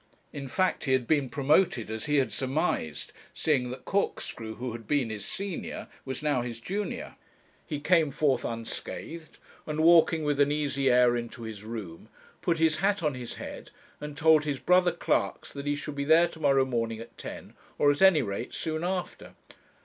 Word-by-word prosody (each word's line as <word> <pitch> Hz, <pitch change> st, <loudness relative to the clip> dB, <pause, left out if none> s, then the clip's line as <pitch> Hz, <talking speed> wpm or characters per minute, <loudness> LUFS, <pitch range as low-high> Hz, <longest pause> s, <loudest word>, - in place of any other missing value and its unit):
In 140 Hz, -1 st, -5 dB
fact, 185 Hz, +7 st, 0 dB
he 130 Hz, -, +2 dB
had 130 Hz, -2 st, +2 dB
been 145 Hz, -1 st, +1 dB
promoted 140 Hz, -, +2 dB
as 110 Hz, 0 st, -3 dB
he 150 Hz, -, +2 dB
had 135 Hz, -, +2 dB
surmised, 130 Hz, -, -1 dB, 0.2 s
seeing 135 Hz, -6 st, +1 dB
that 130 Hz, +1 st, -8 dB
Corkscrew 115 Hz, -, -2 dB
who 125 Hz, 0 st, -4 dB
had 115 Hz, -1 st, -9 dB
been 140 Hz, -6 st, +1 dB
his 105 Hz, -2 st, -4 dB
senior 195 Hz, -3 st, -4 dB, 0.2 s
was 130 Hz, +1 st, -5 dB
now 145 Hz, -4 st, +2 dB
his 120 Hz, -1 st, -5 dB
junior. 200 Hz, -, -4 dB, 0.5 s
He 150 Hz, -3 st, -3 dB
came 160 Hz, 0 st, +3 dB
forth 140 Hz, -1 st, +1 dB
unscathed, 135 Hz, +7 st, -6 dB, 0.3 s
and 150 Hz, 0 st, -3 dB
walking 165 Hz, -1 st, +6 dB
with 145 Hz, -1 st, 0 dB
an 145 Hz, 0 st, +4 dB
easy 140 Hz, -2 st, +1 dB
air 125 Hz, -1 st, +5 dB
into 120 Hz, +1 st, -5 dB
his 110 Hz, -2 st, -7 dB
room, 105 Hz, -7 st, -7 dB, 0.3 s
put 170 Hz, -1 st, +1 dB
his 160 Hz, -1 st, +3 dB
hat 200 Hz, 0 st, +1 dB
on 150 Hz, -2 st, +1 dB
his 125 Hz, -2 st, -6 dB
head -, -, -8 dB, 0.3 s
and 150 Hz, -1 st, -7 dB
told 160 Hz, -1 st, +5 dB
his 145 Hz, -2 st, -2 dB
brother 180 Hz, +5 st, +4 dB
clerks 170 Hz, -, -1 dB
that 140 Hz, 0 st, -6 dB
he 145 Hz, -, +1 dB
should 145 Hz, +1 st, -5 dB
be 140 Hz, 0 st, -2 dB
there 160 Hz, +4 st, +5 dB
to 160 Hz, -, -12 dB
morrow 135 Hz, -3 st, +4 dB
morning 115 Hz, -3 st, -2 dB
at 115 Hz, -, -11 dB
ten, -, -, -9 dB, 0.2 s
or 145 Hz, -, +5 dB
at 145 Hz, -, -3 dB
any 190 Hz, -7 st, +6 dB
rate 100 Hz, +3 st, -4 dB
soon 160 Hz, 0 st, -3 dB
after. 180 Hz, 0 st, -4 dB
145 Hz, 190 wpm, -28 LUFS, 120-160 Hz, 0.5 s, walking